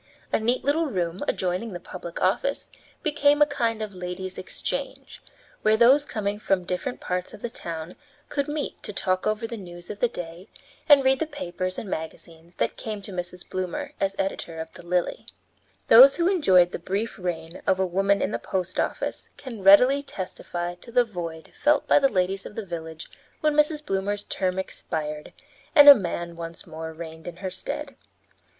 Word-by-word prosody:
A - - +4
neat 235 +3 0
little 310 +4 +2
room 180 -6 -2
adjoining 185 +4 -1
the 175 - -5
public 175 -1 -8
office 235 +9 0 0.3
became 295 -1 +3
a 295 - +7
kind 230 -7 -1
of 210 -2 -6
ladies' 180 +1 -6
exchange, - - -5 0.4
where 215 0 +4
those 265 +5 +6
coming 205 -4 -3
from 195 -3 +1
different 180 +8 -3
parts 180 +3 -3
of 210 - -16
the 240 - -3
town 165 -4 -6 0.3
could 280 -1 -2
meet 295 0 -4
to 210 - -6
talk 185 -1 0
over 215 +1 0
the 230 0 -5
news 175 -2 -9
of 205 - -8
the 245 - +3
day 175 -2 -8 0.4
and 285 -2 +8
read 265 0 +4
the 320 - -1
papers 185 - -4
and 220 - -5
magazines 165 0 -7
that - - -1
came 210 -2 -5
to 200 - -8
Mrs. 180 0 -6
Bloomer 185 -1 -4
as 195 0 0
editor 170 -4 -3
of 160 0 -6
the - - -12
Lily. 175 +1 -1 0.6
Those 265 +4 +9
who 340 0 +2
enjoyed 190 - +4
the - - -4
brief 200 +6 -3
reign 170 -2 -4
of 190 - +3
a 190 - +3
woman 195 +2 +2
in 190 - -1
the - - -2
post 185 -1 -3
office - - -2
can 235 -6 -8
readily 250 +9 +7
testify 175 -7 -5
to - - -9
the 245 0 +4
void 170 -6 -7
felt 295 -1 +2
by - - +6
the 275 -1 +3
ladies 190 -1 0
of - - -10
the 220 - -4
village 160 -3 -7 0.3
when 305 -1 +3
Mrs. 300 0 +2
Bloomer's 200 0 -1
term 185 -1 -1
expired 150 -5 -4 0.4
and 290 -2 +9
a 285 - +15
man 170 -6 -3
once 165 0 -7
more 160 -1 -7
reigned 160 0 -9
in 175 - -6
her 190 +1 -5
stead. - - -6
190 Hz, 185 wpm, -25 LUFS, 175-235 Hz, 0.6 s, a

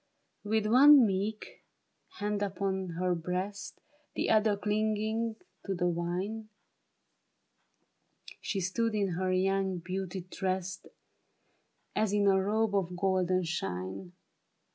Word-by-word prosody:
With 215 0 0
one 265 +4 +8
meek 205 +2 -3 0.5
hand 205 -1 -2
upon 190 -3 -2
her 180 0 +1
breast, 185 +4 -4 0.4
The - - 0
other 215 -1 +3
clinging 215 +2 -1 0.3
to 195 - -1
the 175 0 +1
vine, 185 +6 -3 1.9
She 195 - -2
stood 220 +5 0
in 200 -2 +1
her 185 +2 -1
young 190 0 +1
beauty 185 +2 -4
dressed 185 +1 -4 1.1
As 210 -1 +1
in 205 -1 +2
a 190 -1 +4
robe 215 +2 +1
of 180 -2 -1
golden 185 -1 +1
shine. 95 - -4
195 Hz, 110 wpm, -30 LUFS, 185-215 Hz, 1.9 s, one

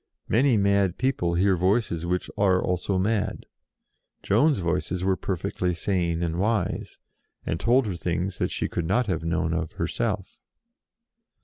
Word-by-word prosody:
Many 125 +1 +3
mad 100 -2 +2
people 105 -10 0
hear 95 +2 +3
Voices 90 -2 0
which 90 +1 -1
are 95 -3 +3
also 90 +2 -1
mad; 105 +1 -1 0.8
Joan's 135 +8 +3
Voices 90 0 -1
were 95 0 +2
perfectly 90 -1 -2
sane 85 -2 0
and 85 0 -2
wise, 105 -2 -1 0.5
and 80 - -2
told 120 +5 +3
her 100 -4 -3
things 90 +3 -2
that - - 0
she - - -2
could 85 -2 -3
not 120 +7 +2
have 85 -6 -2
known 85 0 0
of 85 -2 -2
herself. - - -3
95 Hz, 145 wpm, -25 LUFS, 85-100 Hz, 0.8 s, Many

